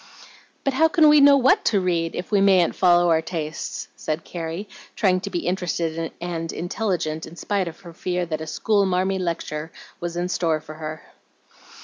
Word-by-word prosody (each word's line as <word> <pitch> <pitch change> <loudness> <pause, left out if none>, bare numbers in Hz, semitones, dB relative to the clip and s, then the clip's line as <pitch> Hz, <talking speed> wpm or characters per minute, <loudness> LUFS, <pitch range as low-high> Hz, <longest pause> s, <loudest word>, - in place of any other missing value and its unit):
"But 275 - 0
how 320 +5 +4
can 320 -2 +5
we 300 -1 +7
know 280 0 +8
WHAT 260 0 +4
to 210 -3 +3
read 170 -3 -1
if 180 - -5
we 200 -2 +3
mayn't 190 -3 +4
follow 175 -1 +4
our 160 0 +3
tastes?" 155 -2 -5
said 155 +1 -3
Carrie, 170 +4 -5 0.3
trying 185 -3 +2
to 200 - -4
be 175 -3 -3
interested 165 -3 -2
and 165 -1 -4
"intelligent" 175 -4 -2
in 165 - -12
spite 195 +1 -1
of 165 - -8
her 170 -3 -11
fear 180 +1 -2
that 160 -2 -4
a 160 - -6
"school 200 +4 +1
marmy" 190 +1 0
lecture 160 -3 -3 0.3
was 170 0 -4
in 175 +1 -1
store 165 -3 0
for 155 0 -11
her. 155 0 -7
175 Hz, 190 wpm, -23 LUFS, 165-195 Hz, 0.3 s, know